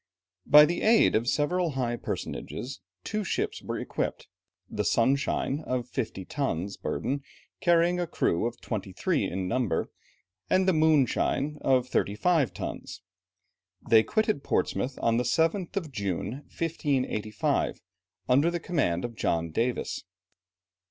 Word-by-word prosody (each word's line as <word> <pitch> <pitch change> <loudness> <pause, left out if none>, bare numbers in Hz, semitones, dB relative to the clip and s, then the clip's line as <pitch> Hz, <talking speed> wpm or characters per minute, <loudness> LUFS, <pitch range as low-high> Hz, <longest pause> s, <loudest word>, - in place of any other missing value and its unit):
By 150 +1 +9
the 175 +3 -2
aid 225 +1 +5
of 115 +2 +1
several 165 +4 +1
high 125 -3 -1
personages, 130 +2 -5 0.2
two 215 0 -2
ships 185 - -2
were - - -4
equipped; - - -3 0.4
the - - -2
Sunshine, 135 +3 +1
of 130 -5 -3
fifty 110 -7 -4
tons' 100 - -2
burden - - -3
and 140 0 -2 0.4
carrying 175 +1 +3
a 175 - -1
crew 85 - +1
of 120 0 -7
twenty 100 -4 -4
three - - 0
in 95 0 -3
number, 110 -6 -1 0.6
and 185 0 +3
the 190 - +5
Moonshine, 150 -1 +2
of 130 -1 +2
thirty 100 -4 0
five 155 - +2
tons. 90 - -7 0.8
They 110 -1 +7
quitted 215 - 0
Portsmouth 130 +1 -1
on 115 0 +3
the 125 - +1
7th 165 - 0
of 165 -7 -3
June, 100 -7 -2 0.2
1585, 130 -10 -1 0.5
under 140 +6 +4
the 175 0 -2
command 135 - 0
of 120 - -5
John 85 -4 -1
Davis. 120 +8 -1
135 Hz, 140 wpm, -28 LUFS, 115-165 Hz, 0.8 s, By